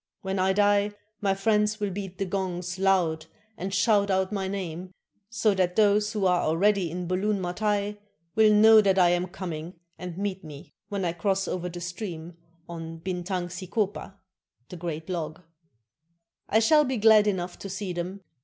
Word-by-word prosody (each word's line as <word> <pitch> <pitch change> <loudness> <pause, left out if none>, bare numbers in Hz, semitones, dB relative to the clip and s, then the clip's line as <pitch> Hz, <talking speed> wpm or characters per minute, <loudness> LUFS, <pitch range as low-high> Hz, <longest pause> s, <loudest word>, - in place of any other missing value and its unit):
When 190 0 -2
I 190 +1 +3
die, 205 +1 +2 0.3
my 195 -2 +1
friends 210 +1 +1
will 205 -2 -1
beat 190 -1 -6
the 195 - -1
gongs 185 -1 -3
loud 175 -5 +1 0.3
and 195 -1 -5
shout 200 +1 +3
out 190 0 +1
my 195 -2 -2
name, 185 -2 -5 0.4
so 220 -2 +2
that 180 -2 0
those 210 0 +3
who 210 -3 0
are 180 -1 +3
already 190 +3 +2
in 180 +2 -4
Bulun 195 +3 0
Matai 205 +3 -1 0.3
will 220 -1 +5
know 220 +1 +7
that 195 -2 +2
I 180 -2 +5
am 175 +1 0
coming, 175 -2 -6 0.2
and 180 -1 -7
meet 195 -1 -3
me 150 -2 -11 0.2
when 200 -2 -2
I 170 - 0
cross 195 +3 -1
over 180 0 -3
the 175 0 -8
stream 175 -2 -6 0.3
on 165 -1 -7
Bintang 180 0 -3
Sik6pa 190 +2 -3 0.5
[the - - -8
great 160 -2 -5
log], 170 -2 -4 1.1
I 220 - +3
shall 300 +7 +5
be 260 -3 -2
glad 215 -1 +6
enough 180 -3 -2
to 195 - -7
see 190 -1 -4
them. 180 +3 -5
190 Hz, 175 wpm, -26 LUFS, 175-205 Hz, 1.1 s, know